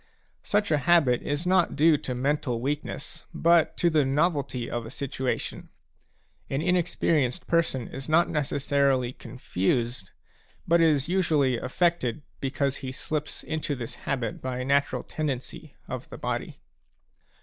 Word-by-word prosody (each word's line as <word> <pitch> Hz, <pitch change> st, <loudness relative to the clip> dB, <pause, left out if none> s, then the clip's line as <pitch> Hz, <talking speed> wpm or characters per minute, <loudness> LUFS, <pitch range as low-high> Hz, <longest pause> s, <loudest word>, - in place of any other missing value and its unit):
Such 205 Hz, -2 st, 0 dB
a 150 Hz, -, +3 dB
habit 140 Hz, -4 st, +4 dB
is 145 Hz, +4 st, -2 dB
not 180 Hz, -1 st, +3 dB
due 155 Hz, +2 st, +5 dB
to 130 Hz, -3 st, -3 dB
mental 130 Hz, -2 st, 0 dB
weakness, 145 Hz, +4 st, -4 dB
but 170 Hz, 0 st, +3 dB
to 175 Hz, -, +3 dB
the 155 Hz, -2 st, +4 dB
novelty 140 Hz, -3 st, 0 dB
of 120 Hz, -1 st, -3 dB
a 115 Hz, -, -8 dB
situation; 130 Hz, 0 st, -3 dB, 0.8 s
an 135 Hz, -, -1 dB
inexperienced 165 Hz, -6 st, +1 dB
person 160 Hz, -8 st, +1 dB
is 135 Hz, +3 st, -7 dB
not 165 Hz, +2 st, +4 dB
necessarily 140 Hz, -3 st, +1 dB
confused, 115 Hz, -2 st, -2 dB, 0.6 s
but 170 Hz, 0 st, +4 dB
is 150 Hz, -4 st, +3 dB
usually 155 Hz, -8 st, +2 dB
affected, 155 Hz, -3 st, 0 dB, 0.2 s
because 135 Hz, 0 st, -1 dB
he 130 Hz, -2 st, -5 dB
slips 150 Hz, +2 st, -4 dB
into 155 Hz, -2 st, -2 dB
this 120 Hz, -3 st, -6 dB
habit 125 Hz, -6 st, -3 dB
by 130 Hz, -1 st, -3 dB
natural 140 Hz, +2 st, +1 dB
tendency 140 Hz, -5 st, -5 dB
of -, -, -6 dB
the -, -, -8 dB
body. -, -, -3 dB
140 Hz, 135 wpm, -27 LUFS, 130-160 Hz, 0.8 s, due